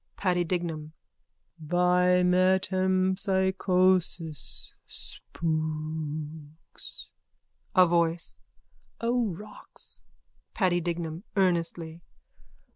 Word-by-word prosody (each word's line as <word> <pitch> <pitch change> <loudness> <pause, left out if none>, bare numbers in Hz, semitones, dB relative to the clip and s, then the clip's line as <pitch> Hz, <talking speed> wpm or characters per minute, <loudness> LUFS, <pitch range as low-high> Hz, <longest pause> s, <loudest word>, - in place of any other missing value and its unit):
PADDY 180 -2 +1
DIGNAM: 160 -3 -3 0.7
By 180 +2 +3
metempsychosis. 185 -2 +2 0.2
Spooks. 155 -1 -5 0.7
A 185 -1 +8
VOICE: 170 -1 0 0.6
O 235 0 +1
rocks. 205 +3 -10 0.5
PADDY 180 -4 +2
DIGNAM: 170 0 -3
_(Earnestly.) 170 -3 0
175 Hz, 55 wpm, -28 LUFS, 160-185 Hz, 0.7 s, A